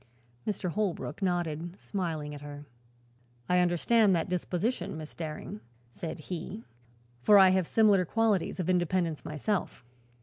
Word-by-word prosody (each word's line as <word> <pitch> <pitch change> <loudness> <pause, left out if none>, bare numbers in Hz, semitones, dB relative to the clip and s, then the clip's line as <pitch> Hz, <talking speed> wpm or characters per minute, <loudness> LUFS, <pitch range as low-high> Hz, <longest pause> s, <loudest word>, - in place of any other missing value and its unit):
Mr. 195 -4 -1
Holbrook 195 -4 -2
nodded, 175 -1 -1
smiling 160 -7 -3
at 145 - -8
her. 145 0 -8 0.8
"I 180 0 +3
understand 185 +4 +4
that 165 +2 -1
disposition, 180 +1 -1
Miss 155 -1 -8
Daring," 155 -9 -6 0.3
said 160 +3 -6
he, 185 +6 -6 0.6
"for 205 +11 +7
I 190 -1 +8
have 185 -2 +2
similar 210 -4 +4
qualities 210 -1 +1
of 180 - -1
independence 175 -3 +1
myself." 155 - -2
180 Hz, 130 wpm, -30 LUFS, 160-195 Hz, 0.8 s, I